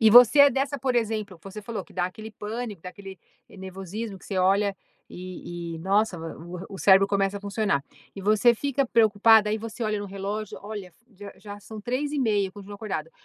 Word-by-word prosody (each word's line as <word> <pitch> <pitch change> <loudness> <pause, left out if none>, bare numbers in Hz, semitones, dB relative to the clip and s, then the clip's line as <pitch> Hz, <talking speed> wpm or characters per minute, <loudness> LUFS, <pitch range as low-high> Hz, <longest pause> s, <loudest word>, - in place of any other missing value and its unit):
E 220 -1 +6
você 245 +5 +9
é 285 0 +9
dessa, 275 +2 -1
por 260 -1 0
exemplo 215 -5 -1
você 195 +2 -8
falou 225 +1 -5
que - - -19
dá 175 -1 0
aquele 215 +4 -9
pânico, 215 -1 -5
dá 180 - -6
aquele 195 -1 -11 0.3
nervosismo 195 +2 -7
que - - -18
você 195 - -2
olha 195 +2 +3 0.3
e 175 -2 -7
e, - - -7
nossa, 195 +1 +1
o 165 +2 -7 0.2
o - - -7
cérebro 195 0 +6
começa 200 0 0
a - - -16
funcionar. 200 -7 0 0.3
E 195 - -7
você 215 +4 +4
fica 275 +3 0
preocupada, 220 -1 +5
e 215 - +1
você 230 +2 -6
olha 215 -1 0
no 205 - -4
relógio: 200 +2 -5
"Olha, 205 -3 -7 0.2
já 200 +1 -9
já 205 -1 -9
são 215 +1 -9
03:30 250 -4 0
eu - - -16
continuo 205 0 -10
acordada, 190 -7 -4
205 Hz, 200 wpm, -26 LUFS, 190-220 Hz, 0.3 s, você